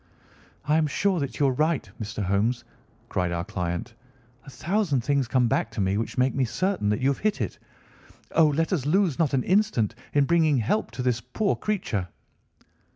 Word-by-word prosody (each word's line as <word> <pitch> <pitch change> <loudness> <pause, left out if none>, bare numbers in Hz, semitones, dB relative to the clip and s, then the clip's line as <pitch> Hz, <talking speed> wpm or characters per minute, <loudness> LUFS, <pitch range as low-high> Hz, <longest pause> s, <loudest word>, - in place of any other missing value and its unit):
"I 150 +1 +3
am 160 -1 +2
sure 190 +4 +1
that 140 -2 -4
you 145 - +4
are 135 - +3
right, 155 +2 0
Mr. 105 0 -4
Holmes," 105 +6 0 0.4
cried 90 -1 -1
our 85 0 -2
client. 90 +5 -3 0.5
"A - - -10
thousand 170 - 0
things 140 0 +1
come 125 -1 +2
back 115 - 0
to - - -5
me 95 0 +1
which 115 - -4
make 130 +1 +2
me 135 - +1
certain 180 - 0
that 105 - 0
you 135 - +3
have 140 - -1
hit 215 0 0
it. - - -3 0.7
Oh, 160 -2 +5
let 160 +5 0
us 145 -6 -1
lose 180 -3 +2
not 155 -5 +2
an 130 - +1
instant 180 - +2 0.2
in 145 -1 +4
bringing 160 -2 +3
help 120 - 0
to 125 - -2
this 125 -2 0
poor 160 - -1
creature." 120 - -2
135 Hz, 195 wpm, -26 LUFS, 115-165 Hz, 0.7 s, Oh